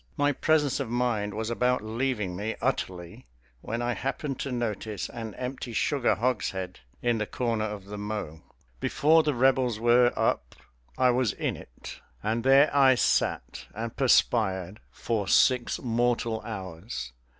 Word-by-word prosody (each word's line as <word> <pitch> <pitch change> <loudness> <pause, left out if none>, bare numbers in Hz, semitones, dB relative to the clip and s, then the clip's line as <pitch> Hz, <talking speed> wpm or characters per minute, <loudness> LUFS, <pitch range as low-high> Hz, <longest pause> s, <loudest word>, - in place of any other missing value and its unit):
My 145 0 +3
presence 145 -1 +1
of 135 -5 -3
mind 115 -4 -1
was 110 +1 -3
about 125 -1 +1
leaving 110 -4 -2
me 105 +4 -3
utterly 90 - -3 0.3
when 115 +2 -3
I 120 0 0
happened 135 +2 -3
to 140 - -3
notice 110 -4 -3
an 115 -3 -7
empty 125 -1 -5
sugar 140 +2 +1
hogshead 95 -6 -2 0.2
in 120 -2 +1
the 105 - -2
corner 115 -3 -1
of 105 -3 -6
the 105 +1 -7
mow. 105 -7 -5 0.4
Before 160 +2 +4
the 150 -3 -1
Rebels 125 -2 +2
were 120 +1 +5
up - - 0 0.4
I 130 -1 +4
was 125 -3 +1
in - - -2
it, - - -11 0.2
and 110 +2 -1
there 135 +2 +5
I 135 -2 +6
sat - - 0
and 115 +1 -5
perspired 105 -7 +2
for 110 -4 -3
six 125 +4 +3
mortal 120 -1 0
hours. 95 - -6
120 Hz, 150 wpm, -27 LUFS, 105-130 Hz, 0.4 s, I